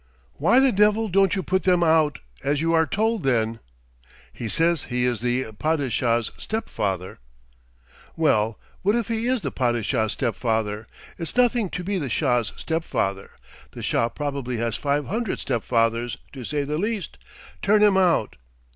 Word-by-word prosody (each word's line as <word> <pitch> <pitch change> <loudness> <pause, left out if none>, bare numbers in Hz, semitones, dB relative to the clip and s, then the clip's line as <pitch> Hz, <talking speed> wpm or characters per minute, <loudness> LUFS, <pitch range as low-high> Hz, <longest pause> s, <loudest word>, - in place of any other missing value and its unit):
"Why 255 - +4
the 270 -1 +5
devil 210 +2 +3
don't 195 +1 +3
you 190 - -2
put 185 +2 +1
them 180 -2 +3
out, 160 -2 +3 0.3
as 140 +1 +1
you 165 +2 +1
are 160 -1 +3
told, 220 +4 0
then?" 115 -4 +1 0.7
"He 115 - -5
says 165 +1 +1
he 125 0 -1
is 120 -4 0
the 120 -1 -1
Padishah's 120 -3 0
step 220 +1 -4
father." 95 -2 -3 1.0
"Well, 115 -9 +2 0.2
what 205 +3 +2
if 235 -2 -1
he 225 +1 -1
is 255 -3 0
the - - -2
Padishah's 115 -3 0
step 120 -5 -1
father? 110 -2 -2 0.3
It's 165 - -4
nothing 245 -4 +3
to 180 - -5
be 195 +1 -1
the 140 -5 -3
Shah's 120 0 +1
step 160 0 -2
father; 95 -9 -2 0.4
the - - -8
Shah 115 - +1
probably 140 -4 -3
has 115 0 -1
five 145 0 0
hundred 225 0 -2
step 120 -4 -2
father's, 115 +1 0 0.2
to 130 -3 -7
say 145 +4 -1
the 150 +2 -2
least 210 -3 -3 0.4
turn 210 +1 +4
him 205 -2 +5
out. 175 - +2
145 Hz, 170 wpm, -24 LUFS, 115-190 Hz, 1.0 s, the